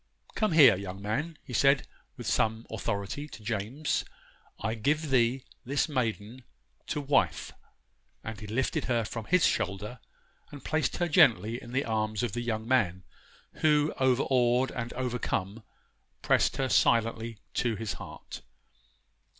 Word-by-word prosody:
'Come 215 -5 0
here, 135 -9 +8
young 95 0 -6
man,' 140 +11 -3
he 125 - -10
said, 140 +3 +4 0.3
with - - -8
some 110 +1 0
authority, 100 +6 -3
to 110 - -12
James, 115 +7 -2 0.6
'I 110 +2 -1
give 145 +7 0
thee 125 0 +2 0.2
this 140 +3 0
maiden 120 -3 -3 0.4
to - - -2
wife,' 145 0 +1 0.7
and 110 -1 -6
he 105 - -8
lifted 120 +5 -1
her 120 -3 0
from 110 0 -6
his 180 - +3
shoulder 105 +5 -1 0.5
and 145 -2 -11
placed 155 -3 0
her 175 - +1
gently 120 - +4
in 120 - -11
the 135 +3 0
arms 110 -1 -1
of 120 - -1
the 120 - -3
young 110 -2 -3
man, 95 -8 +1 0.5
who, 150 -1 +3
overawed 130 -1 +2
and 120 -1 -4
overcome, 115 -5 -2 0.6
pressed - - +2
her 135 - 0
silently 115 -2 +2 0.2
to 120 -3 0
his 110 0 -3
heart. - - -9
120 Hz, 140 wpm, -29 LUFS, 110-135 Hz, 0.7 s, here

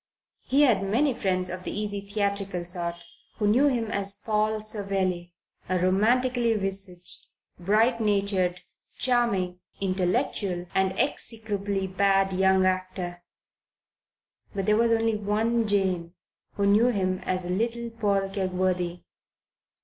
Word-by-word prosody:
He 280 +3 +3
had 230 -9 +4
many 240 +9 +1
friends 185 -4 0
of 185 0 -6
the - - -3
easy 205 -1 -3
theatrical 200 -3 -2
sort, 170 -1 -1 0.4
who 210 - -1
knew 245 +8 +4
him 235 -5 0
as 200 -2 +1
Paul 215 0 0
Savelli, 195 -4 -2 0.4
a 185 - +2
romantically 230 +6 +2
visaged, 195 -3 -4 0.3
bright 220 +6 +2
natured, 195 -4 +1 0.4
charming, 200 -8 +1 0.2
intellectual, 185 -1 0
and 190 0 +1
execrably 205 -6 -2
bad 195 0 +2
young 190 0 +3
actor. 185 -1 -2 1.3
But 195 -1 -1
there 210 +1 +4
was 230 +1 +3
only 225 0 +2
one 220 +3 0
Jane 185 -4 0 0.4
who 200 - 0
knew 210 +4 +5
him 185 -5 0
as 185 -1 -2
little 230 +6 -2
Paul 200 -4 0
Kegworthy. 185 -2 -1
200 Hz, 120 wpm, -26 LUFS, 185-220 Hz, 1.3 s, knew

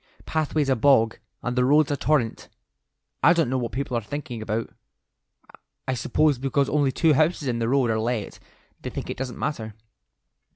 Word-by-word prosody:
Pathway's 155 -2 0
a 135 - +3
bog, 115 -3 +3 0.2
and 125 0 -2
the 125 - +3
road's 145 +3 +4
a - - +1
torrent. 140 -5 0 0.7
I 150 +6 +6
don't 165 -7 +1
know 130 - +1
what 120 -2 -3
people 135 -1 -3
are 120 - 0
thinking 120 0 -6
about. 110 +1 -3 1.2
I 130 - 0
suppose 145 +2 +1
because 135 +1 0
only 145 -2 +2
two 160 +4 +3
houses 155 0 +1
in 120 -2 -1
the 115 0 0
road 130 -3 +2
are 110 - 0
let, 115 -2 -3 0.4
they - - -5
think - - -5
it - - -6
doesn't 130 -1 -5
matter." 110 -8 -4
130 Hz, 180 wpm, -24 LUFS, 115-145 Hz, 1.2 s, I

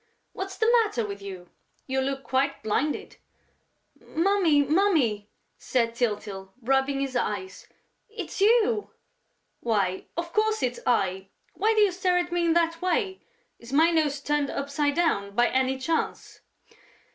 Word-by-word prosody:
What's 385 0 -6
the 440 - +1 0.2
matter 245 - -2
with 200 -1 -7
you?... 185 -3 -9 0.3
You 265 0 -1
look 270 0 -2
quite 270 0 -1
blinded...." 255 +8 -2 0.8
"Mummy!... 335 -4 +2
Mummy!" 280 - +1 0.3
said 230 -2 0
Tyltyl, 205 -5 -3
rubbing 270 +2 +1
his 270 -2 -3
eyes. 200 -5 -3 0.4
"It's 405 -3 -6
you!..." 445 0 +3 0.7
"Why, 200 -5 0
of 340 0 -4
course, 435 0 +1
it's 245 -1 -1
I!... 190 -5 +1 0.3
Why 440 +3 +1
do 430 - +4
you 410 -2 +4
stare 360 0 +1
at 350 0 -1
me 345 -1 +1
in 330 - +3
that 330 0 +1
way?... 375 +1 0 0.4
Is 235 +1 -12
my 320 +4 +4
nose 300 -4 +1
turned 290 -1 0
upside 285 +1 -1
down, 200 -13 0
by 240 +2 +4
any 260 +1 +1
chance?" 320 +5 -3
280 Hz, 145 wpm, -26 LUFS, 235-350 Hz, 0.8 s, do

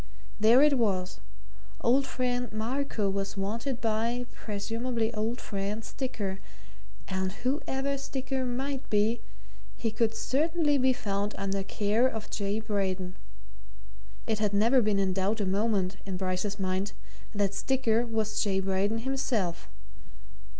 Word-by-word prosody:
There 230 +6 +7
it 290 -3 +5
was 190 -5 0 0.6
old 270 +3 +3
friend 245 -2 -1
Marco 225 0 -1
was 195 +1 -2
wanted 230 +6 -2
by 230 +2 0
(presumably 225 +2 -2
old 225 +3 -1
friend) 205 +2 -3
Sticker, 205 -8 -3 0.7
and 190 0 -1
whoever 275 0 0
Sticker 265 -1 -2
might 265 +2 -2
be 220 +2 +2 0.6
he 225 - -1
could 225 0 +1
certainly 295 +3 +2
be 260 0 +5
found 205 -4 -1
under 195 0 -1
care 210 +5 +2
of 220 -4 -5
J. 205 0 -1
Braden. 190 -4 -1 1.1
It 220 -1 0
had 210 -1 +1
never 230 +5 +5
been 210 -2 +2
in 190 -1 +2
doubt 195 +4 0
a 205 - +1
moment, 195 -1 +1
in 190 -2 -4
Bryce's 185 +2 -1
mind, 190 +1 -1 0.4
that 200 -1 +1
Sticker 235 0 +2
was 220 -2 0
J. 195 -2 +2
Braden 195 +4 0
himself. 240 -10 -1
220 Hz, 130 wpm, -29 LUFS, 195-250 Hz, 1.1 s, There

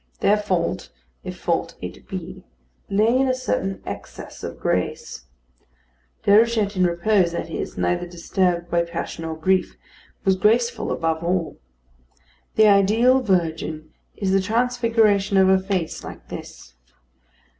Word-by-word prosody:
Their 205 +1 +4
fault, 185 -5 -2 0.3
if - - -7
fault - - -1
it - - -9
be, - - -7 0.5
lay 215 +4 +3
in 265 +1 +3
a 255 - +1
certain 255 -6 -2
excess - - -8
of - - -6
grace. 65 - -2 1.0
Déruchette 215 -1 +4
in 185 -1 +3
repose, 175 +1 +2
that - - -4
is, - - -5
neither 175 0 0
disturbed 175 0 -1
by 170 - +3
passion 170 -1 -5
or 160 0 -4
grief, 185 +3 +1 0.5
was 190 -1 +4
graceful 235 +5 +1
above 160 0 -1
all. 175 -1 -1 1.0
The 220 - +6
ideal 215 +6 +4
virgin 160 -6 -1 0.2
is 195 -2 -1
the 195 0 +3
transfiguration 225 -2 +2
of 190 0 +5
a 190 0 +5
face 190 -4 -3
like - - -10
this. 60 - -9
195 Hz, 135 wpm, -22 LUFS, 170-220 Hz, 1.0 s, The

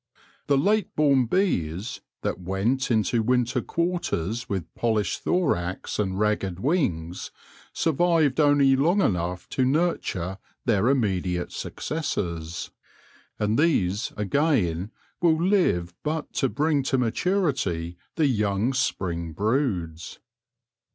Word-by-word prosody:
The 140 - +3
late 210 +9 +1
born 140 -5 +3
bees, 110 - -1 0.2
that - - -2
went 100 +10 0
into 115 0 +2
winter 125 +2 +1
quarters 125 - -2
with 95 -6 -4
polished 110 -3 0
thorax 95 - -1
and 95 -2 0
ragged 100 -4 0
wings, 95 - -1 0.4
survived 160 -3 +2
only 145 -2 +5
long 165 +9 +3
enough 90 - 0
to 130 - 0
nurture 130 - 0 0.3
their 110 -2 +2
immediate 95 -9 0
successors; 85 - -4 0.7
and 105 +3 +1
these, 105 - +1
again, 105 - +1 0.3
will 165 -2 +4
live 170 - +2
but 155 0 -3
to 135 - +1
bring 150 +1 +1
to 135 0 0
maturity 125 - 0 0.2
the 160 - +2
young 105 -1 +1
spring 85 -10 -2
broods. 95 - -1
115 Hz, 110 wpm, -25 LUFS, 90-145 Hz, 0.7 s, only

